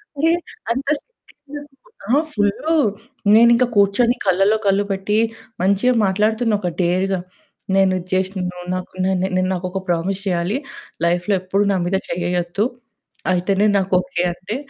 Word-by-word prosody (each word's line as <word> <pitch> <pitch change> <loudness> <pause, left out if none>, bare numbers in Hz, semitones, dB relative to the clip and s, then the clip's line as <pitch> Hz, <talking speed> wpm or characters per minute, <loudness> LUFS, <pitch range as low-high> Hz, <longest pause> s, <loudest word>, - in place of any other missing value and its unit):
అరే! 320 +4 +2 0.4
అంత 270 +3 -2
సిగ్గెందుకు 290 - -14 0.3
ఆ! - - +5
ఫుల్లు. 205 +10 0 0.6
నేనింకా 235 +2 +6
కూర్చొని 205 +5 +3
కళ్ళలో 195 +3 +3
కళ్ళు 195 +1 +3
పెట్టి 195 +2 -1 0.5
మంచిగా 200 +6 +3
మాట్లాడుతున్న 215 +4 +1
ఒక 180 - -1
డేర్‌గా. 185 +2 +1 0.6
నేను 195 -1 +4
ఇది 180 - -11
జేశినను. 185 -1 -1 0.2
నాకు 185 0 -5
నె 190 - +2 0.2
నె 185 - +2
నాకొక 185 +1 -3
ప్రామిస్ 175 +3 0
చేయాలి 180 +5 0 0.5
లైఫ్‌లో 175 +4 +1
ఎప్పుడూ 190 +2 0
నా - - +1
మీద 190 +2 +1
చేయ్యేయొద్దు. 175 +2 -1 0.7
అయితేనే 195 +3 +1
నాకు 195 -1 -1
ఓకే 275 -10 -3
అంటే. 185 +5 -6
195 Hz, 130 wpm, -20 LUFS, 185-225 Hz, 0.7 s, నేనింకా